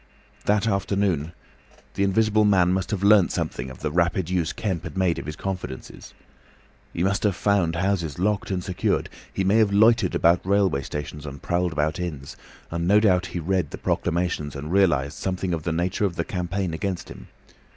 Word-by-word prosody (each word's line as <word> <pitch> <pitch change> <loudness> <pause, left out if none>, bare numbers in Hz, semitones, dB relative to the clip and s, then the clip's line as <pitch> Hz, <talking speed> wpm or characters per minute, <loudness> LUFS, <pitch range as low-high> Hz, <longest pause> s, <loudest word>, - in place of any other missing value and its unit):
That 105 +1 +2
afternoon 100 -6 0 0.6
the 100 - 0
Invisible 110 +2 +3
Man 95 -3 +4
must 95 -1 -1
have 100 -2 -2
learnt 100 -3 +5
something 65 +2 -3
of 65 - -11
the 75 0 -2
rapid 85 +1 +1
use 85 -3 0
Kemp 95 -7 -3
had 85 +2 -7
made 90 -3 +1
of - - -8
his 75 - -5
confidences. 90 -10 -6 0.8
He 85 - -2
must 100 +1 +1
have 100 -3 +1
found 90 -2 +1
houses 85 -5 -1
locked 100 +2 0
and 90 -2 -2
secured; 90 -2 -1 0.2
he 95 - -1
may 100 +3 +3
have 110 -3 +4
loitered 110 -1 +4
about 85 +1 +3
railway 95 -7 +2
stations 75 +1 -6
and 70 0 -7
prowled 90 +2 0
about 75 +1 -1
inns, 75 -6 -5 0.4
and 85 +1 -2
no 105 +3 +6
doubt 90 -4 +3
he 85 - -4
read 90 -2 0
the - - -7
proclamations 85 -4 -1
and 75 +3 -6
realised 85 -8 +2
something 95 -1 -2
of 80 - -2
the 85 - -2
nature 90 +5 0
of 90 -4 -2
the - - -2
campaign 90 -1 -2
against 95 +2 -3
him. - - -11
90 Hz, 190 wpm, -24 LUFS, 80-100 Hz, 0.8 s, no